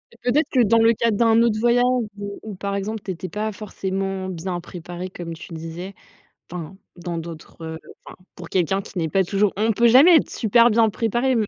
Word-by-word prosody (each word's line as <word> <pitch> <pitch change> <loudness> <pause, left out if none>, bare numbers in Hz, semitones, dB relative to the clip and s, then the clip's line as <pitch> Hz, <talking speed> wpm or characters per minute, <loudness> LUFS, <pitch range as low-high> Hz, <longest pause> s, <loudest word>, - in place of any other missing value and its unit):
mais - - -24 0.2
peut-être 305 +4 +2
que 260 - +2
dans 230 +1 +4
le 225 0 +5
cadre 230 -1 +1
d'un 230 +1 +4
autre 230 -2 +2
voyage 240 +1 +3 0.3
où 200 0 -6
où 215 -2 -7
par 200 +1 -4
exemple, 210 +2 -4
tu - - -5
étais 185 0 -5
pas 215 +5 -3
forcément 195 -2 -4
bien 175 0 -4
préparée 175 +1 -8
comme 175 -2 -7
tu 165 - -11
le - - -6
disais 170 +4 -7 0.6
enfin, 175 +1 -7 0.2
dans 175 -1 -5
d'autres, 165 0 -9
heu, 160 0 -6 0.3
enfin, - - -12 0.2
pour - - -9
quelqu'un 190 +2 0
qui 190 - -8
n'est 165 -2 0
pas 190 +5 +2
toujours 200 +2 +1
on 220 +2 +2
peut 235 +3 +4
jamais 285 +9 +8
être - - +1
super 235 +1 +4
bien 225 0 +4
préparé 240 +4 0
200 Hz, 215 wpm, -22 LUFS, 175-225 Hz, 0.6 s, jamais